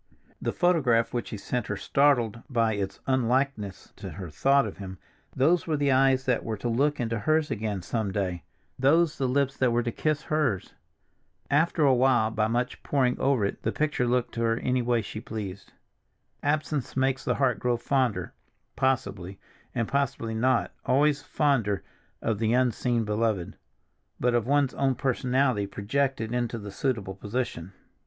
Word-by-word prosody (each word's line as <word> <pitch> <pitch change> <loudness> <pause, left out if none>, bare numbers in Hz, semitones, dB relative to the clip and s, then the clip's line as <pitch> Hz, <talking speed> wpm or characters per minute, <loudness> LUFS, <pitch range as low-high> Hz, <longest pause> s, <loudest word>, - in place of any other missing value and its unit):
The - - -1
photograph 135 -11 +2
which 120 - -2
he 110 - -5
sent 120 +3 -3
her 105 - -3
startled 120 -4 +2
by 115 -4 +2
its 100 -2 -3
unlikeness 130 -5 0
to - - -7
her 90 -4 -8
thought 135 - +3
of - - -7
him; 95 -2 -7 0.4
those 160 +7 +3
were 155 -2 +1
the 140 -1 +2
eyes 130 0 +3
that 125 -2 +1
were 110 -1 -3
to 100 - -4
look 140 +6 +1
into 115 -2 -1
hers 155 +6 +1
again 105 -4 -2
some 110 0 -2
day, 95 -4 -2 0.4
those 160 +4 +3
the 135 - +1
lips 135 +1 +1
that 130 - +3
were 120 0 +1
to 120 - -2
kiss 150 +3 -1
hers. 135 - -1 0.8
After 160 +2 +3
a 135 -2 +5
while 125 -3 +3
by 110 -1 +1
much 120 +2 -2
poring 130 -3 +1
over 135 -7 +2
it, 100 - -4
the - - -1
picture 150 -5 0
looked 125 0 0
to 115 - -3
her 115 0 +2
any 125 +1 0
way 120 -1 +1
she 110 +1 -7
pleased. 100 -4 -7 0.7
"Absence 145 -3 -1
makes 135 0 +1
the - - 0
heart 130 -4 +1
grow 120 -1 +1
fonder"—possibly, 120 -3 -2 0.4
and 115 -3 0
possibly 135 -5 -1
not 120 +2 +1
always 145 +3 +2
fonder 120 -10 0 0.4
of 110 -3 0
the 110 0 +1
unseen 120 -1 +1
beloved, 105 -4 -1 0.6
but 125 0 +2
of 120 -1 +1
one's 140 -1 +2
own 135 -1 +1
personality, 125 -3 +1
projected 115 +3 -1
into 120 -1 -1
the 100 -2 -7
suitable 105 -4 -2
position. 100 -3 -4
125 Hz, 165 wpm, -27 LUFS, 110-135 Hz, 0.8 s, a